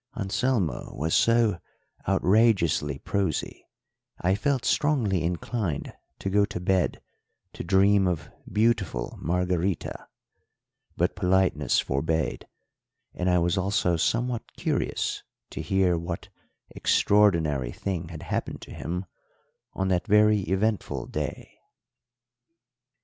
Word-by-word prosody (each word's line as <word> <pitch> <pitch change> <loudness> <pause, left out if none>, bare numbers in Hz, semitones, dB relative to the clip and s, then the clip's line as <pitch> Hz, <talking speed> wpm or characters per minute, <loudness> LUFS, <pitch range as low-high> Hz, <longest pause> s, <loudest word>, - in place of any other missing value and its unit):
Anselmo 100 - -1
was 80 +2 -1
so 115 -6 +3 0.5
outrageously 95 - +3
prosy, 95 0 -2 0.5
I 90 +2 +2
felt 130 +5 0
strongly 120 - +2
inclined 90 - -2 0.2
to 95 - -3
go 100 +1 +4
to 100 - -3
bed 90 0 0 0.5
to - - -6
dream 95 +2 +4
of 90 -4 -3 0.2
beautiful 105 - 0
Margarita; 90 +1 -1 0.9
but - - +1
politeness 90 -5 +2
forbade, 80 +4 -1 0.7
and 90 0 -1
I 90 - +4
was 85 +2 +1
also 95 -2 +1
somewhat 120 +7 -1
curious - - -1 0.3
to - - -5
hear 95 -3 +2
what 85 +1 -5 0.5
extraordinary 80 -11 +3
thing 90 0 -4
had 80 -3 -8
happened - - -3
to - - -11
him 90 +4 -4 0.7
on 95 0 -1
that 90 -2 0
very 105 0 +5
eventful 105 +2 0
day. - - -5
95 Hz, 105 wpm, -26 LUFS, 85-105 Hz, 0.9 s, very